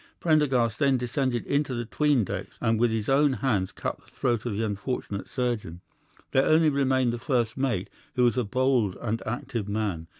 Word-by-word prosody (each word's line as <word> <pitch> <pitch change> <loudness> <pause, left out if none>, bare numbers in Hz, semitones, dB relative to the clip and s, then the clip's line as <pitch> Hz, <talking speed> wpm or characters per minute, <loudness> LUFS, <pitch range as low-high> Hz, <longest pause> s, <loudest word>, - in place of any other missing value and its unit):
Prendergast 130 -8 +2
then 140 -3 +3
descended 125 0 -1
into 140 -2 0
the 120 0 -3
'tween 145 +1 +2
decks - - -6
and 115 -1 +1
with 120 0 +4
his 110 -1 -2
own 140 +1 +4
hands 105 -6 0
cut - - -4
the - - -22
throat 120 -2 -1
of 105 -4 -2
the 115 - 0
unfortunate 105 -1 -4
surgeon. 115 -9 -3 0.5
There 135 -1 +4
only 155 +1 +4
remained 130 -3 +2
the 120 - -4
first 120 -4 0
mate, 125 -8 -1 0.3
who 125 - +3
was 120 -3 +3
a 125 - +1
bold 120 -3 +1
and 115 0 -2
active 110 -2 -3
man. 100 -6 -2
120 Hz, 190 wpm, -27 LUFS, 110-135 Hz, 0.5 s, with